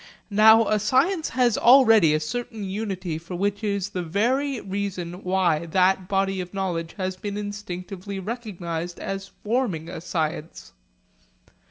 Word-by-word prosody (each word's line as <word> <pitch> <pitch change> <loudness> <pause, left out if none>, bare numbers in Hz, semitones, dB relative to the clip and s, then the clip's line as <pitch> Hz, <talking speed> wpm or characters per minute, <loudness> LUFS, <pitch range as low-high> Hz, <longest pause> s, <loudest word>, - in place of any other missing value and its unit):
Now 220 +2 +6
a 215 - +2
science 275 - +2
has 240 -2 +2
already 225 - +6
a - - +1
certain 225 +7 -5
unity 190 -4 -3
which 195 +5 -3
is 200 -2 -1
the 185 - -3
very 245 - 0
reason 190 -3 -4
why 180 -3 +1
that 185 +2 +2
body 195 -1 0
of 180 +2 -9
knowledge 170 -4 -2
has 185 -1 -2
been 200 +2 -5
instinctively 200 -1 -6
recognised 180 -6 -5
as 195 0 -4 0.2
forming 210 -8 -1
a 170 - -7
science. 160 -2 -4
195 Hz, 135 wpm, -24 LUFS, 180-215 Hz, 0.2 s, Now